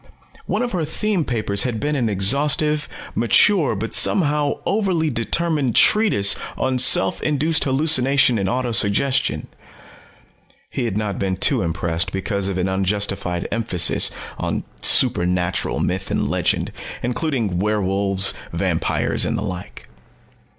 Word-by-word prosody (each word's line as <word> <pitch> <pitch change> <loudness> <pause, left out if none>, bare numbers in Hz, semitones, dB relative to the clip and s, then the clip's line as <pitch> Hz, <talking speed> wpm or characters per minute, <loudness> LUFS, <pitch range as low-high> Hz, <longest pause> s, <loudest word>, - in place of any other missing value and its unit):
One - - -1
of 245 - -3
her 180 -5 -2
theme 185 +4 -1
papers 105 -5 0
had 120 -4 -1
been 150 +4 -2
an 120 -5 0
exhaustive, 145 +9 +2 0.2
mature 145 - +3
but 110 +2 -4
somehow 150 -5 +2
overly 185 -7 0
determined, 135 +2 -1
treatise 205 - +4 0.2
on 130 -1 -1
self 95 -6 +4
induced 155 +1 +1
hallucination 135 -3 +3
and 95 -1 -1
auto 125 -1 -2
suggestion. 115 +5 +1 1.3
He 130 - -3
had 110 -3 -2
not 105 -2 -3
been 95 -1 -2
too 125 +4 +2
impressed 85 -1 -2
because 95 0 -2
of 95 -2 -3
an 90 0 -1
unjustified 95 -2 -1
emphasis 95 -8 +2 0.3
on - - -3 0.2
supernatural 90 0 +1
myth 95 +1 -2
and - - -1
legend, - - -1 0.3
including 120 - -2
werewolves, 100 -1 0 0.2
vampires, - - -1
and - - -1
the - - -4
like. 90 -3 -8
115 Hz, 130 wpm, -20 LUFS, 95-150 Hz, 1.3 s, treatise